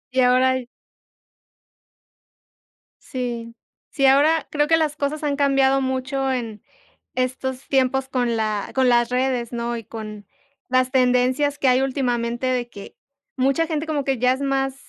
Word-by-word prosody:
Y 260 Hz, -, +4 dB
ahora 255 Hz, +1 st, +4 dB
y 245 Hz, -, -10 dB, 2.4 s
Sí. 240 Hz, -3 st, -5 dB, 0.4 s
Sí, 275 Hz, -2 st, 0 dB
ahora 295 Hz, +4 st, +4 dB
creo 295 Hz, 0 st, +1 dB
que 325 Hz, -, +4 dB
las 310 Hz, -2 st, 0 dB
cosas 300 Hz, +1 st, -3 dB
han 285 Hz, -1 st, 0 dB
cambiado 275 Hz, -1 st, +3 dB
mucho 265 Hz, +1 st, -1 dB
en 230 Hz, -5 st, -4 dB, 0.5 s
estos 255 Hz, +1 st, -3 dB
tiempos 265 Hz, 0 st, +1 dB
con 245 Hz, -3 st, 0 dB
la 215 Hz, -2 st, -2 dB
con 260 Hz, -1 st, +3 dB
las 240 Hz, -1 st, +3 dB
redes, 250 Hz, -2 st, -1 dB
¿no?, 235 Hz, 0 st, -2 dB
y 230 Hz, -, -7 dB
con 215 Hz, -1 st, -8 dB, 0.4 s
las 255 Hz, 0 st, +2 dB
tendencias 255 Hz, +3 st, +2 dB
que 275 Hz, -, +1 dB
hay 255 Hz, +1 st, +4 dB
últimamente 245 Hz, -2 st, -1 dB
de 250 Hz, -2 st, -1 dB
que 200 Hz, -3 st, -11 dB, 0.4 s
mucha 275 Hz, +5 st, +1 dB
gente 310 Hz, -1 st, -2 dB
como 305 Hz, -3 st, -2 dB
que 270 Hz, -2 st, 0 dB
ya 250 Hz, +1 st, +3 dB
es 260 Hz, -, -6 dB
más 270 Hz, -1 st, 0 dB
260 Hz, 155 wpm, -22 LUFS, 245-275 Hz, 2.4 s, Y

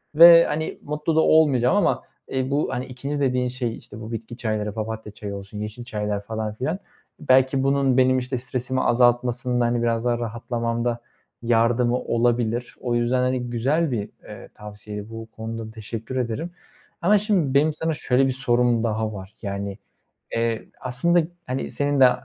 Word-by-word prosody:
ve, 170 Hz, +1 st, +10 dB
hani, 160 Hz, +1 st, -3 dB
mutlu 150 Hz, +2 st, -2 dB
da -, -, +5 dB
olmayacağım. 140 Hz, -7 st, +4 dB
Ama, 205 Hz, -, +2 dB, 0.3 s
eee, 130 Hz, 0 st, -1 dB
bu, 145 Hz, +2 st, +1 dB
hani, 125 Hz, -, -2 dB
2'nci 135 Hz, +3 st, -4 dB
dediğin 125 Hz, -2 st, +1 dB
şey, 120 Hz, -2 st, -3 dB
işte, 105 Hz, -, -12 dB
bu 110 Hz, +1 st, -7 dB
bitki 115 Hz, +1 st, -6 dB
çayları; 110 Hz, -3 st, -2 dB
papatya 110 Hz, -1 st, -5 dB
çayı 105 Hz, -1 st, -6 dB
olsun, 100 Hz, +1 st, -8 dB
yeşil 105 Hz, +3 st, -6 dB
çaylar 105 Hz, -3 st, -2 dB
falan 110 Hz, 0 st, -3 dB
filan, 145 Hz, -, -2 dB, 0.4 s
belki 130 Hz, -2 st, +3 dB
bunun 135 Hz, -1 st, +2 dB
benim, 130 Hz, 0 st, +4 dB
işte, 125 Hz, 0 st, -3 dB
stresimi 130 Hz, +1 st, -2 dB
azaltmasında, 120 Hz, 0 st, +2 dB
hani, 120 Hz, 0 st, +1 dB
biraz 115 Hz, 0 st, 0 dB
daha 120 Hz, -1 st, +1 dB
rahatlamamda 115 Hz, 0 st, -2 dB, 0.4 s
yardımı 120 Hz, +1 st, +3 dB
olabilir. 120 Hz, 0 st, 0 dB
O 120 Hz, -2 st, -1 dB
yüzden, 120 Hz, +2 st, +1 dB
hani, 125 Hz, -1 st, 0 dB
güzel 140 Hz, +7 st, +1 dB
bir, 105 Hz, -4 st, -2 dB
eee, -, -, -11 dB
tavsiye. 105 Hz, 0 st, -8 dB
Bu 115 Hz, 0 st, -8 dB
konuda 110 Hz, 0 st, -6 dB
teşekkür 115 Hz, +3 st, -7 dB
ederim. 125 Hz, +8 st, -2 dB, 0.5 s
Ama 205 Hz, +5 st, +5 dB
şimdi 195 Hz, -, +1 dB
benim 150 Hz, +2 st, +4 dB
sana 160 Hz, +1 st, -1 dB
şöyle 135 Hz, -2 st, +2 dB
bir 130 Hz, -, +1 dB
sorum 120 Hz, -2 st, +2 dB
daha 110 Hz, -1 st, -1 dB
var. 95 Hz, 0 st, -9 dB
Yani, 100 Hz, -1 st, -4 dB, 0.6 s
eee, 115 Hz, -1 st, -1 dB, 0.2 s
aslında, 155 Hz, +8 st, +2 dB, 0.3 s
hani, 130 Hz, +1 st, -3 dB
senin 145 Hz, -1 st, 0 dB
de 130 Hz, -, +8 dB
120 Hz, 165 wpm, -23 LUFS, 115-130 Hz, 0.6 s, ve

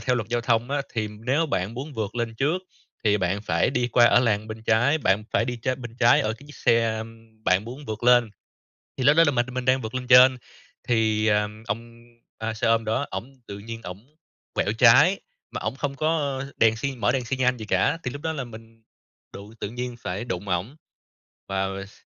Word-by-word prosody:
theo 125 Hz, -2 st, 0 dB
luật 110 Hz, -2 st, -3 dB
giao 120 Hz, 0 st, 0 dB
thông 115 Hz, +2 st, 0 dB
á, 145 Hz, -1 st, 0 dB
thì 110 Hz, -2 st, -1 dB
nếu 125 Hz, +10 st, -1 dB
bạn 100 Hz, -4 st, -2 dB
muốn 140 Hz, +4 st, -6 dB
vượt 110 Hz, 0 st, -4 dB
lên 115 Hz, -1 st, -2 dB
trước 155 Hz, +9 st, 0 dB, 0.4 s
thì 105 Hz, -1 st, +4 dB
bạn 95 Hz, +3 st, -1 dB
phải 85 Hz, +3 st, +1 dB
đi 125 Hz, -2 st, 0 dB
qua 120 Hz, +1 st, +5 dB
ở 120 Hz, -, +5 dB
làn 110 Hz, -2 st, 0 dB
bên 110 Hz, 0 st, -7 dB
trái, 120 Hz, +8 st, +2 dB
bạn 105 Hz, -6 st, +1 dB
phải 115 Hz, -, +2 dB
đi 125 Hz, 0 st, -3 dB
trên 130 Hz, +2 st, -3 dB
bên 120 Hz, 0 st, -9 dB
trái 120 Hz, -1 st, +5 dB
ở 110 Hz, +1 st, -1 dB
cái 140 Hz, +6 st, -13 dB
chiếc 145 Hz, -, -13 dB
xe 115 Hz, -1 st, +1 dB, 0.4 s
bạn 95 Hz, +3 st, +2 dB
muốn 130 Hz, +5 st, -9 dB
vượt 110 Hz, +1 st, -5 dB
lên. 120 Hz, -3 st, +5 dB, 0.7 s
Thì 130 Hz, -, -2 dB
lúc 150 Hz, +4 st, +5 dB
đó 165 Hz, -, +8 dB
là 145 Hz, -, +3 dB
mình 120 Hz, -2 st, +1 dB
mình 130 Hz, 0 st, -4 dB
đang 130 Hz, 0 st, +3 dB
vượt 110 Hz, +3 st, -6 dB
lên 125 Hz, -1 st, -4 dB
trên, 130 Hz, 0 st, +7 dB, 0.5 s
thì, 110 Hz, -2 st, +2 dB
ờ, 105 Hz, 0 st, +2 dB, 0.2 s
ông 115 Hz, +2 st, -6 dB, 0.5 s
xe 110 Hz, -, 0 dB
ôm 115 Hz, -1 st, +2 dB
đó 120 Hz, +6 st, 0 dB
ổng 135 Hz, +4 st, -6 dB
tự 100 Hz, 0 st, -7 dB
nhiên 115 Hz, +2 st, -8 dB
ổng 105 Hz, +12 st, -10 dB, 0.4 s
quẹo 105 Hz, -, 0 dB
trái 145 Hz, +11 st, +6 dB, 0.3 s
mà -, -, -4 dB
ổng 110 Hz, +4 st, -3 dB
không 140 Hz, 0 st, -3 dB
có 145 Hz, -3 st, -1 dB
đèn 110 Hz, -1 st, +4 dB
xi 135 Hz, +3 st, -3 dB
mở 115 Hz, -1 st, +1 dB
đèn 130 Hz, -2 st, -1 dB
xi 130 Hz, +3 st, -2 dB
nhan 125 Hz, -1 st, +1 dB
gì 110 Hz, -, -7 dB
cả, 95 Hz, -, +1 dB
thì 125 Hz, -, -3 dB
lúc 145 Hz, +1 st, -8 dB
đó 160 Hz, -1 st, -2 dB
là 140 Hz, -4 st, -4 dB
mình 115 Hz, -1 st, -13 dB, 0.5 s
đụng, 100 Hz, +2 st, -10 dB
tự 100 Hz, -, -3 dB
nhiên 125 Hz, +1 st, -5 dB
phải 100 Hz, +4 st, -4 dB
đụng 95 Hz, -2 st, -5 dB
ổng. 90 Hz, -, -2 dB, 0.7 s
Và 95 Hz, 0 st, -1 dB, 0.2 s
s -, -, -19 dB
120 Hz, 225 wpm, -24 LUFS, 110-130 Hz, 0.7 s, đó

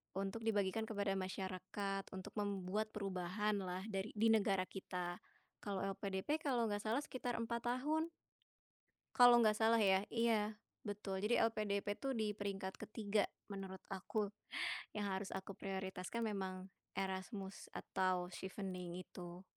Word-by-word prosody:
untuk 195 Hz, +4 st, -2 dB
dibagikan 210 Hz, -1 st, +2 dB
kepada 205 Hz, -3 st, 0 dB
masyarakat, 190 Hz, +1 st, -2 dB
untuk 190 Hz, +2 st, -7 dB
membuat 205 Hz, +1 st, 0 dB
perubahanlah 195 Hz, 0 st, -1 dB
dari 195 Hz, 0 st, -2 dB
di 220 Hz, +2 st, +4 dB
negara 195 Hz, -4 st, +4 dB
kita. 180 Hz, -2 st, -3 dB, 0.5 s
Kalau 200 Hz, -2 st, -1 dB, 0.2 s
LPDP, 200 Hz, -, -1 dB
kalau 245 Hz, -5 st, +3 dB
nggak 205 Hz, 0 st, -1 dB
salah 225 Hz, +4 st, +2 dB
sekitar 250 Hz, -3 st, -2 dB
4 235 Hz, 0 st, -1 dB
tahun. 300 Hz, +6 st, +2 dB, 1.1 s
Kalau 245 Hz, -1 st, +10 dB
nggak 215 Hz, -1 st, +5 dB
salah 225 Hz, +1 st, +5 dB
ya 195 Hz, 0 st, +5 dB
iya, 225 Hz, -2 st, +2 dB, 0.3 s
betul 200 Hz, -2 st, -2 dB
jadi 210 Hz, +5 st, +3 dB
LPDP 205 Hz, -2 st, 0 dB
tuh 270 Hz, -1 st, -1 dB
di 220 Hz, -2 st, +1 dB
peringkat 200 Hz, -2 st, -3 dB
ke-3 210 Hz, -2 st, +1 dB, 0.2 s
menurut 190 Hz, -2 st, -5 dB
aku, 200 Hz, +2 st, -1 dB, 0.6 s
yang 205 Hz, -1 st, -1 dB
harus 190 Hz, 0 st, -2 dB
aku 190 Hz, +1 st, -4 dB
prioritaskan 190 Hz, +2 st, -3 dB
memang 190 Hz, -2 st, -3 dB, 0.2 s
Erasmus 190 Hz, +1 st, -3 dB
atau 185 Hz, -1 st, +1 dB
Chevening 185 Hz, -2 st, -4 dB
itu. 175 Hz, 0 st, -8 dB
200 Hz, 130 wpm, -40 LUFS, 190-220 Hz, 1.1 s, Kalau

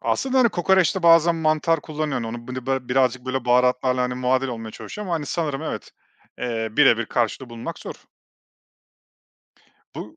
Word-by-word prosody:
Aslında, 265 Hz, 0 st, 0 dB
hani, 240 Hz, -2 st, +5 dB
kokoreçte 190 Hz, 0 st, +2 dB
bazen 165 Hz, 0 st, +5 dB
mantar 155 Hz, 0 st, +1 dB
kullanıyorsun 150 Hz, -5 st, -3 dB
onu 120 Hz, +2 st, -8 dB
bılı 130 Hz, 0 st, -6 dB
ba 130 Hz, -2 st, -2 dB
birazcık, 130 Hz, 0 st, +1 dB
böyle, 130 Hz, -1 st, -2 dB
baharatlarla, 125 Hz, +1 st, +2 dB
hani, 125 Hz, 0 st, -1 dB
muadil 130 Hz, +1 st, 0 dB
olmaya 115 Hz, -2 st, -6 dB
çalışıyor 210 Hz, -, -8 dB
ama 165 Hz, -5 st, -2 dB
sanırım, 150 Hz, -2 st, -2 dB
evet, -, -, -5 dB, 0.5 s
eee, 115 Hz, -2 st, -2 dB
birebir 120 Hz, -6 st, +4 dB
karşılığı 120 Hz, +2 st, -2 dB
bulmak 115 Hz, 0 st, -7 dB
zor. -, -, -10 dB, 1.9 s
Bu -, -, -8 dB
130 Hz, 150 wpm, -23 LUFS, 125-160 Hz, 1.9 s, hani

